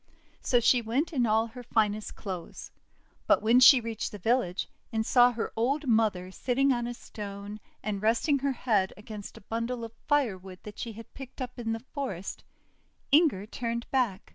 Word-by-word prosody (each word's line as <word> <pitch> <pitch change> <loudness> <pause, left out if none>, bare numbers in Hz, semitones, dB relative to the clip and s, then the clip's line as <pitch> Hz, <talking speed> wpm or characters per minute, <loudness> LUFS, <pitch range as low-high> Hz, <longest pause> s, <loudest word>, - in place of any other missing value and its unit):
So 245 - +3
she 240 +1 +4
went 260 +9 -1
in 245 -5 +2
all 220 +1 +3
her 240 +2 -10
finest 215 -3 0
clothes. 185 -5 -7 0.6
But - - +4
when 230 +3 +5
she 255 +1 +9
reached 225 -2 -4
the 205 - -7
village, 205 -2 0 0.2
and 220 -1 -1
saw 245 +1 +6
her 230 -1 -4
old 275 +7 0
mother 215 -6 +1
sitting 270 +6 +1
on 240 -1 -2
a 240 - -5
stone, 205 -1 -8 0.2
and 200 -2 -2
resting 235 +7 +2
her 275 0 0
head 210 -7 +1
against 210 -1 -9
a - - -12
bundle 230 +3 -3
of 225 0 -7
firewood 195 -11 0
that 210 -1 -10
she 230 - -4
had 225 +2 -12
picked 270 -2 -10
up 250 -1 -6
in 225 -1 -2
the 225 +2 -6
forest, 225 - -4 0.7
Inger 285 - +4
turned 235 +1 -3
back. 235 -7 0
230 Hz, 180 wpm, -29 LUFS, 210-250 Hz, 0.7 s, she